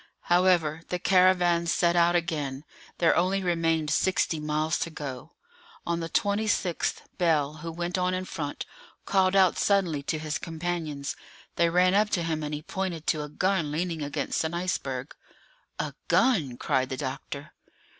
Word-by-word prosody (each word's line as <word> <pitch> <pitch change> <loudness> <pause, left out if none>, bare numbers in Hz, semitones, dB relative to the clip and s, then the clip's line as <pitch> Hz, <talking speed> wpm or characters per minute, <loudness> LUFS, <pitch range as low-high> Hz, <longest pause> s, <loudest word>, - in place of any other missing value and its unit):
However, 175 -4 +3
the 180 - -1
caravan 180 -2 +3
set 170 0 +2
out 175 0 +4
again; 150 -5 -2 0.3
there 170 - +4
only 190 +2 +1
remained 165 -3 +1
sixty 170 -1 +1
miles 155 +2 0
to - - -2
go. 140 -5 -7 0.5
On 170 0 -1
the 165 0 -4
26th, 205 -3 0 0.2
Bell, 155 -4 +2
who 165 +2 -6
went 175 +2 -2
on 180 0 +1
in 185 0 -3
front, 150 -6 -5 0.4
called 190 -1 +2
out 190 -2 +4
suddenly 185 -8 +2
to 150 +3 -2
his 155 -1 -3
companions. 160 -4 -4 0.4
They 170 0 +3
ran 180 +2 +4
up 210 +1 +3
to 170 - -1
him, 160 -1 -1
and 150 -1 -4
he 150 - -7
pointed 180 -4 -4
to 155 - +1
a 150 - -6
gun 175 -1 0
leaning 165 +1 -2
against 145 +1 -2
an 160 +1 -2
iceberg. 140 -7 -3 0.6
"A - - -3
gun!" 160 - +2
cried 130 -1 0
the 130 - -4
doctor. 140 +2 -6
165 Hz, 160 wpm, -27 LUFS, 150-180 Hz, 0.6 s, out